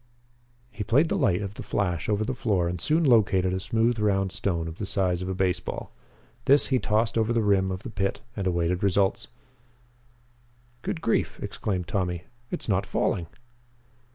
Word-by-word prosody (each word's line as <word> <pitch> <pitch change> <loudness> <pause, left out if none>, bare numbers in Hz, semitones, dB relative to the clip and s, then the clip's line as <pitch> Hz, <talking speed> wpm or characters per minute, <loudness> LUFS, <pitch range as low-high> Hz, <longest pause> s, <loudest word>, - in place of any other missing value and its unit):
He 105 0 -4
played 140 - +3
the - - +1
light 110 - +2
of 100 0 -5
the - - -8
flash 90 -4 -1
over 105 0 +1
the 130 - -1
floor 100 -8 +1
and 85 0 -3
soon 160 - +2
located 100 - +4
a 95 - -1
smooth 115 +4 +1
round 95 -2 +1
stone 85 -4 -1
of 80 +1 -8
the 105 - -2
size 90 -2 0
of 90 - -3
a 95 - -2
baseball. 90 -1 -2 0.5
This 140 +2 +5
he 130 - +4
tossed 110 0 +1
over 110 +1 +1
the 115 -1 +2
rim 95 -2 +3
of 95 +1 -5
the - - -6
pit 95 0 -1 0.2
and 100 -2 -2
awaited 85 0 0
results. 100 0 +1 1.5
"Good 160 - -3
grief!" 115 - 0
exclaimed 90 -5 -3
Tommy. 90 -3 -1 0.3
"It's - - -5
not 100 -2 +1
falling!" 85 -3 0
100 Hz, 180 wpm, -26 LUFS, 90-110 Hz, 1.5 s, This